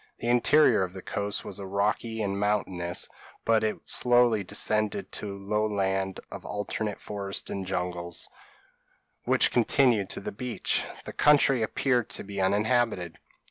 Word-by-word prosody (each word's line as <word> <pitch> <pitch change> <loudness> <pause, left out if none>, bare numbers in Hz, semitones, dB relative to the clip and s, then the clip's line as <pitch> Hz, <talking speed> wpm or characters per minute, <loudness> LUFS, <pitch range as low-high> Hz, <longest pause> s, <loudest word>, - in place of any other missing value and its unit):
The 120 - -3
interior 125 0 +5
of 90 -1 -2
the 95 - -9
coast 100 0 -3
was 95 - -7
rocky 105 +3 -1
and 100 -1 -2
mountainous; 95 -4 -1 0.4
but 115 -1 +3
it 110 -1 0
slowly 120 -4 +4
descended 110 - 0
to 100 -2 -5
low 105 +2 -1
land 95 -2 -1
of - - -7
alternate 105 0 -3
forest 100 -1 -4
and 95 -1 -4
jungles, 90 -2 -3 1.0
which - - +4
continued 120 -4 +3
to - - -4
the - - -5
beach: 125 +2 -1 0.2
the - - -7
country 140 -4 +4
appeared 120 +2 0
to - - -3
be 100 -1 -4
uninhabited. 105 -3 +1
105 Hz, 140 wpm, -27 LUFS, 95-115 Hz, 1.0 s, interior